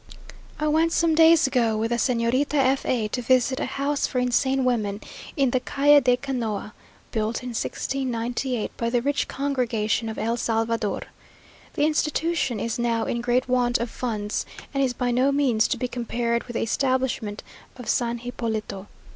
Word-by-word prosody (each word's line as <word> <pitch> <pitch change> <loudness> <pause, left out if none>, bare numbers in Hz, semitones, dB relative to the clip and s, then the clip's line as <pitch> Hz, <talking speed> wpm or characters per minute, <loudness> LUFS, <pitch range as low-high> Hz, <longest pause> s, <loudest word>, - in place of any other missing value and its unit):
I 305 - 0
went 320 +2 +3
some 330 -1 +3
days 325 0 +6
ago 235 -5 +1
with 225 +2 -1
the 240 - +1
Señorita 250 +4 +1
F 270 -1 +2
a 230 -4 +1
to 250 - -2
visit 255 +2 +2
a - - -1
house 280 +2 -1
for - - -4
insane 260 +2 +1
women, 210 -5 0 0.4
in 270 -3 +3
the 255 - +2
Calle 290 +3 +4
de 250 -1 +3
Canoa, 235 -5 -3 0.4
built 220 +2 -2
in 250 - -5
1698, 245 0 -2
by 230 - -1
the 240 0 0
rich 285 +1 0
congregation 235 -5 -1
of 220 - -6
el 230 +2 -1
Salvador. 225 -2 -1 0.7
The 295 - +2
institution 310 -4 0
is 230 0 -2
now 230 -1 +1
in 235 - -2
great 245 +1 +1
want 250 -1 +2
of 235 0 -4
funds; 215 -4 -3 0.3
and 275 - 0
is 255 -2 +1
by 245 -1 -1
no 255 +3 +3
means 260 -6 +2
to - - -1
be 250 - -2
compared 235 -1 -2
with 240 - -8
the - - 0
establishment 255 -3 -1 0.3
of 245 - -9
San 235 -1 0
Hipólito. 220 -5 -4
245 Hz, 170 wpm, -24 LUFS, 230-270 Hz, 0.7 s, days